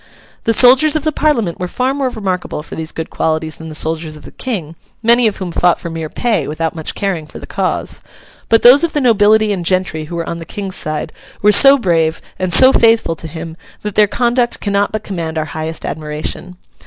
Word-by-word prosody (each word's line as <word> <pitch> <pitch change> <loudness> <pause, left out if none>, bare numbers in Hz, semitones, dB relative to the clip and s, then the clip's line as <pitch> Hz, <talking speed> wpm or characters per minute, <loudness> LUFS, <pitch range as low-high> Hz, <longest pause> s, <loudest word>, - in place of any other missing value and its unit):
The 230 - +3
soldiers 260 +7 +6
of 310 - 0
the 310 - +1
Parliament 245 - 0
were 180 - -3
far 255 +7 -1
more 275 -2 -1
remarkable 190 -9 -4
for - - -12
these 160 0 -5
good 160 - -6
qualities 160 0 -2
than 160 0 -9
the 155 - -8
soldiers 160 0 -2
of - - -15
the - - -11
King 180 - -5 0.3
(many 235 +1 +4
of 210 - -2
whom 185 -2 -5
fought 175 +1 +2
for 170 - -6
mere 160 -1 -5
pay 215 - -1
without 160 +1 -2
much 160 -2 -5
caring 180 -6 -3
for - - -11
the - - -9
cause); - - -2 0.5
but 225 0 +3
those 255 +6 +8
of 335 - 0
the 295 - +1
nobility 215 -3 +4
and 180 -3 -4
gentry 180 -3 0
who 170 +3 -7
were 170 -1 -4
on 170 - -4
the - - -7
King's 195 +2 -5
side 155 -1 -3 0.3
were 210 - +6
so 275 +6 +7
brave, 165 -8 0 0.2
and 185 -1 -1
so 260 +8 +7
faithful 225 -7 +3
to 160 - -7
him, 160 0 -8 0.3
that 210 -1 -4
their 210 +1 +4
conduct 240 +2 0
cannot 200 0 0
but 215 0 -4
command 165 -5 -5
our 155 - -1
highest 160 +1 -5
admiration. 155 +4 -5
185 Hz, 220 wpm, -15 LUFS, 160-230 Hz, 0.5 s, those